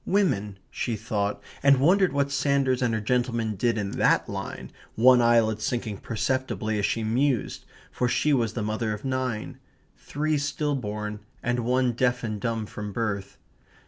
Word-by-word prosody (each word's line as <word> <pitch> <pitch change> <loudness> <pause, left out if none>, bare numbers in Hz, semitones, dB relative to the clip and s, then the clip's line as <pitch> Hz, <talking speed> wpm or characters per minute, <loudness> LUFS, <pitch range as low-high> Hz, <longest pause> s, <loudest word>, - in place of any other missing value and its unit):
"Women" 105 - +1
she 115 - -2
thought, 105 -2 -2 0.2
and 140 -1 +5
wondered 185 +6 +4
what 140 0 0
Sanders 135 -2 +1
and 125 -2 +2
her - - 0
gentleman 115 -1 0
did 115 +4 +1
in 100 -2 -2
THAT - - +2
line, - - -6 0.2
one 125 +2 +6
eyelid 115 -2 +3
sinking 110 -3 -2
perceptibly 110 -2 -1
as 100 - +1
she 115 - -1
mused, 125 +2 0 0.3
for 125 - 0
she 150 +4 +2
was 115 -5 +1
the 115 - -3
mother 110 +1 -1
of 105 - -11
nine 130 -4 -2 0.4
three 150 - -1
still 145 +1 -1
born 105 -4 -4 0.2
and 120 +1 0
one 125 +1 +2
deaf 125 +1 0
and 110 -3 -3
dumb 115 -1 -1
from 105 0 -6
birth. 100 -3 -3
120 Hz, 165 wpm, -26 LUFS, 110-130 Hz, 0.4 s, one